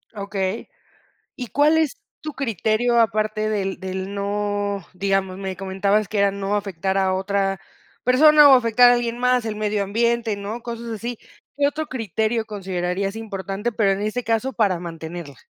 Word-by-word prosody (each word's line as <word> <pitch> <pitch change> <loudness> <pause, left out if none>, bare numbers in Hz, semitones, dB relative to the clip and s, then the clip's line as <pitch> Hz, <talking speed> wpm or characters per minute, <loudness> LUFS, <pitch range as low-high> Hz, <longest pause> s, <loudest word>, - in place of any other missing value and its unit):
Okey. 200 0 -3 0.7
Y 245 -3 -6
cuál 300 +2 +3
es 315 -4 0 0.2
tu 305 - -6
criterio 235 -1 +1
aparte 215 -1 0
del 195 -3 -2
del 190 +1 -5
no 205 -1 -2
digamos, 195 0 -1
me 190 -2 -5
comentabas 195 +2 0
que 210 - -2
era 200 0 +4
no 200 +1 -3
afectar 195 -1 -1
a 190 -1 +2
otra 195 -1 -1 0.4
persona, 295 +3 +7
o 270 - +9
afectar 245 0 +5
a - - +6
alguien 240 0 -2
más, 250 -1 +2
el 215 -2 -3
medio 210 -1 0
ambiente, 230 +1 0
¿no? 210 +4 -6
Cosas 235 0 -6
así. 230 +1 -5 0.4
¿Qué 285 0 +3
otro 310 +2 -2
criterio 220 - -2
considerarías 195 0 -3
importante, 200 0 -4
pero 210 -3 +2
en 195 - -2
este 215 +4 -2
caso, 230 +4 0
para 200 -7 +1
mantenerla? 165 -4 -7
210 Hz, 165 wpm, -22 LUFS, 195-235 Hz, 0.7 s, o